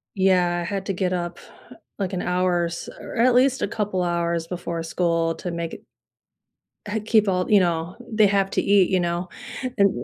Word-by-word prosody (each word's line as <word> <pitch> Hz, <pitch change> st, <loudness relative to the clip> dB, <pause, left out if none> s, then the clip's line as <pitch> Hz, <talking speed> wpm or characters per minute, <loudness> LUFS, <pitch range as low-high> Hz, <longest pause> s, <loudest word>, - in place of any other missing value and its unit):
Yeah, 180 Hz, -2 st, +3 dB
I -, -, -3 dB
had 195 Hz, +1 st, -3 dB
to 195 Hz, -, 0 dB
get 185 Hz, 0 st, -1 dB
up 175 Hz, -1 st, -3 dB, 0.6 s
like 195 Hz, -2 st, -2 dB
an 185 Hz, -, -2 dB
hour 180 Hz, -1 st, +1 dB
or -, -, +1 dB
s 170 Hz, 0 st, -6 dB
or -, -, -8 dB
at 240 Hz, +1 st, +4 dB
least 265 Hz, +1 st, +3 dB
a -, -, +1 dB
couple 205 Hz, -4 st, -1 dB
hours 170 Hz, -1 st, -1 dB
before 170 Hz, -2 st, -4 dB
school 165 Hz, 0 st, 0 dB
to 180 Hz, -, -5 dB
make 170 Hz, -1 st, -4 dB
it -, -, -14 dB, 1.1 s
Uh, 220 Hz, -, 0 dB
keep 215 Hz, -2 st, +3 dB
all 180 Hz, -1 st, 0 dB
you 205 Hz, -2 st, +6 dB
know, 170 Hz, 0 st, -1 dB
they 215 Hz, -1 st, +4 dB
have 195 Hz, -1 st, +2 dB
to -, -, +1 dB
eat, 200 Hz, -2 st, +4 dB
you 185 Hz, -1 st, +2 dB
know, 175 Hz, +1 st, -2 dB, 0.5 s
and 200 Hz, 0 st, +5 dB
180 Hz, 205 wpm, -23 LUFS, 170-200 Hz, 1.1 s, you